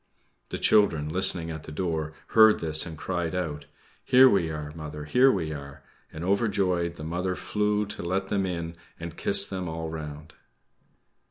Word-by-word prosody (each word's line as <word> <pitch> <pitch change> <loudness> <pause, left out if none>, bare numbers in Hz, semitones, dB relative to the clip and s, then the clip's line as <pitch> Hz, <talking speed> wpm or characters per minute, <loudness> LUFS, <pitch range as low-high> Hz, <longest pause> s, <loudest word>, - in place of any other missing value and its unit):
The - - -4
children, 80 -8 +3
listening 90 -1 +2
at 80 -1 -7
the - - -9
door, 80 -2 -2 0.2
heard 110 -1 +6
this 80 +1 +2
and 80 -2 -8
cried 85 0 -3
out, 80 -5 -4 0.4
"Here 130 +1 +7
we 95 -9 +2
are, 75 -1 -5
mother; 75 -1 -7
here 125 - +5
we 80 -7 -2
are!" 70 -1 -9 0.3
and, 80 - -7
overjoyed, 95 -4 +1
the 75 - -9
mother 90 +3 -2
flew 105 +1 0
to 105 - -7
let 95 +3 -2
them 95 -2 0
in 85 -2 -4 0.2
and 85 -1 -7
kissed 100 0 0
them 95 -3 -3
all 80 0 -5
round. 75 0 -8
85 Hz, 170 wpm, -27 LUFS, 80-95 Hz, 0.4 s, Here